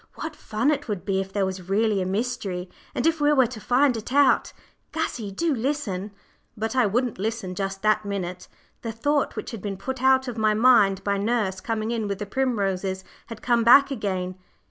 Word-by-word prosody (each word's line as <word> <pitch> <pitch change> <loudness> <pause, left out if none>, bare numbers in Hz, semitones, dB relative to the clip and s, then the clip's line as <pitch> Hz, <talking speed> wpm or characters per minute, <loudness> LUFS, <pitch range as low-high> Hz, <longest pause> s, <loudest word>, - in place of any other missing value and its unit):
What 320 -1 -6
fun 230 +5 0
it 295 -1 -2
would 205 -5 -4
be 195 -1 +1
if 195 0 -7
there 200 -1 0
was 185 -1 -6
really 210 0 +2
a 185 - -2
mystery, 195 -4 -3 0.2
and 245 - -1
if 325 -2 +2
we 295 0 +4
were 265 -3 +5
to 230 -2 -7
find 255 +3 +3
it 225 +2 -6
out. 285 0 +4 0.4
Gussie, 220 -4 -3
do 315 +11 0
listen." 230 -7 -2 0.5
But 220 +3 -2
I 250 -4 +4
wouldn't 240 +1 -1
listen 215 -3 -3
just 195 +1 -4
that 215 0 +3
minute. 185 -3 -4 0.3
The 230 - -4
thought 285 +6 0
which - - -5
had 225 -5 -7
been 200 -1 -4
put 260 +6 -5
out 265 0 +4
of 235 -2 -4
my 215 -1 +3
mind 210 -5 +4
by 200 -1 0
nurse 205 -3 0
coming 220 +1 -2
in 225 -3 -1
with 200 -1 -2
the 205 - -4
primroses 195 -6 -1 0.2
had 230 -2 -9
come 235 -2 +3
back 275 +4 +7
again. 185 -6 -3
215 Hz, 205 wpm, -25 LUFS, 195-250 Hz, 0.5 s, back